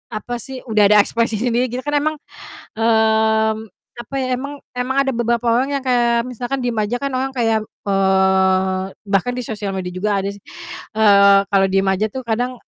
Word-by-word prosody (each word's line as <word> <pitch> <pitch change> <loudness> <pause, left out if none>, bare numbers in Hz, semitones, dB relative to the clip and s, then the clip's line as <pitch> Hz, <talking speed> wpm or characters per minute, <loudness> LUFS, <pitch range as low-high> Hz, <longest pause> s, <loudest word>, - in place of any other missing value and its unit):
apa 245 +3 -5
sih, 265 +2 -8
udah 215 -2 +3
ada 210 - +7
ekspresi 230 0 +1
sendiri, 245 0 0
gitu 250 - -3
kan 295 0 -2
emang, 310 +2 +1 0.6
mmm, 220 -1 +2 0.4
apa 240 +3 -10
ya, 260 - -1
emang 280 +2 -7 0.2
emang 250 +2 -2
ada 275 - 0
beberapa 235 -1 -1
orang 255 +5 +1
yang - - -14
kayak 240 -2 +2
misalkan 250 +2 -4
diem 245 -2 -2
aja 215 +3 0
kan 275 - -1
orang 265 +1 -2
kayak, 225 -3 0
eee, 190 -1 +1 0.2
bahkan 200 +5 +1
di 250 - -4
sosial 210 -4 -5
media 185 -1 -4
juga 195 +2 -1
ada 195 - -3
sih, 200 0 -12 0.5
eee, 200 -2 +6
kalau 195 -1 +3
diem 195 0 +1
aja 190 +3 0
tuh 260 - -5
kadang 245 +2 -2
225 Hz, 185 wpm, -19 LUFS, 200-250 Hz, 0.6 s, ada